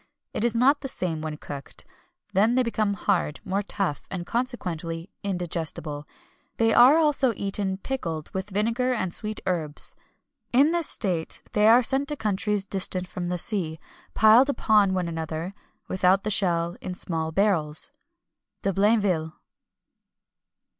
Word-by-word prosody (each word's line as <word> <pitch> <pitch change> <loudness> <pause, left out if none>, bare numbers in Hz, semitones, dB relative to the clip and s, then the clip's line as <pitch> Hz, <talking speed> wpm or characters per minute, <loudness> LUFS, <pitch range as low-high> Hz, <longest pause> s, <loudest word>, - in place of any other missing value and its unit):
It - - -2
is 235 -1 +1
not 270 +5 +3
the 270 - -4
same 170 -10 -2
when 155 -1 -5
cooked; 140 -2 -6 0.5
then 215 +5 +3
they 255 - +3
become 215 -3 -1
hard, 180 -6 -1
more 195 +1 -1
tough, 195 -6 -2
and, 180 -2 -5
consequently, 175 -9 -4
indigestible. 165 -5 -3 0.5
They 225 -1 +3
are 255 +6 +7
also 290 -6 +2
eaten 195 -1 -2
pickled 170 - -5
with 190 +2 -4
vinegar 230 +6 0
and 185 -6 -3
sweet 215 -1 -2
herbs. 165 -5 +1 0.6
In 275 +6 +4
this 340 -2 +3
state 175 -6 +2
they 210 0 +3
are 240 +3 +6
sent 270 +4 +2
to 295 - 0
countries 210 -3 -1
distant 185 -2 0
from 180 -1 -5
the 180 0 -2
sea, 170 -4 -3 0.4
piled 225 +6 +6
up 280 - -4
one 210 -3 +5
upon 180 - -1
the 165 -1 -4
other, 160 +4 -5 0.3
without 190 +1 +2
the 215 - -1
shell, 170 -3 +3
in 185 -1 -5
small 160 -3 -3
barrels." 165 - +1 0.7
DE 195 - 0
BLAINVILLE. 195 -6 +1
195 Hz, 150 wpm, -25 LUFS, 170-225 Hz, 0.7 s, are